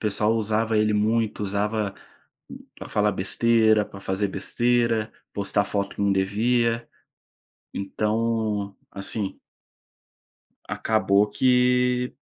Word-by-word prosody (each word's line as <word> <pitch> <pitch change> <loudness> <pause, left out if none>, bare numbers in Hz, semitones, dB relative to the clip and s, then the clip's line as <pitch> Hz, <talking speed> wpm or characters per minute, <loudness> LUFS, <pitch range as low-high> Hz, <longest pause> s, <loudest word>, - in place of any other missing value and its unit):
pessoal 105 +2 +1
usava 110 0 0
ele 105 0 +2
muito, 110 +1 0
usava 105 +1 -1 0.8
pra - - -9
falar 105 0 +2
besteira, 110 +2 +2
pra 100 - -12
fazer 95 +1 -1
besteira, 115 +2 0 0.2
postar 100 0 0
foto 100 0 -3
que - - -6
não 100 -1 +3
devia. 115 +4 +1 0.9
Então, 105 0 -1 0.2
assim 100 0 -4 1.3
acabou 105 -2 +2
que 125 +1 +2
105 Hz, 100 wpm, -24 LUFS, 100-115 Hz, 1.3 s, não